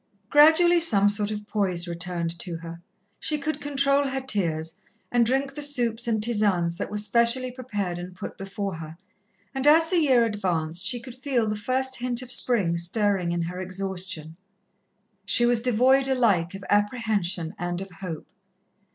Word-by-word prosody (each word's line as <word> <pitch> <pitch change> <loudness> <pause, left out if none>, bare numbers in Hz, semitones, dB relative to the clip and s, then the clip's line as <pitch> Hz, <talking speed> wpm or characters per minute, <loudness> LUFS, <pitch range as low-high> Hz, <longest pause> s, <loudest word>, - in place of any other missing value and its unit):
Gradually 320 +4 +6
some 205 -12 +5
sort 205 0 0
of 210 -1 -5
poise 185 -5 -1
returned 170 -1 -3
to 175 -1 -4
her. 165 0 -10 0.4
She 305 - 0
could 295 +1 -4
control 280 0 +1
her 270 0 -2
tears, 170 -10 0 0.3
and 240 -1 +3
drink 270 +4 0
the 295 - -6
soups 240 -6 +1
and 220 -2 0
tisanes 200 -7 +1
that - - -4
were 210 - -4
specially 235 +4 +2
prepared 205 -8 -4
and 180 +1 -9
put - - -8
before 195 0 -5
her, 160 0 -9 0.6
and 270 +1 -1
as 325 +3 +5
the 360 - +3
year 260 -7 +3
advanced, 175 -6 -2
she 240 +3 +2
could 250 +1 -11
feel 255 -3 -1
the 210 - -1
first 260 +5 -1
hint 245 0 -1
of 250 - -9
Spring 200 -11 +2
stirring 185 0 +1
in 170 0 -1
her 180 +2 -5
exhaustion. 185 -3 -4 0.9
She 240 - +4
was 240 -1 +2
devoid 255 +3 +3
alike 205 -10 +1
of 195 0 -9
apprehension 205 -5 0
and 175 0 -3
of 195 0 -8
hope. 170 -3 -7
210 Hz, 170 wpm, -25 LUFS, 180-255 Hz, 0.9 s, Gradually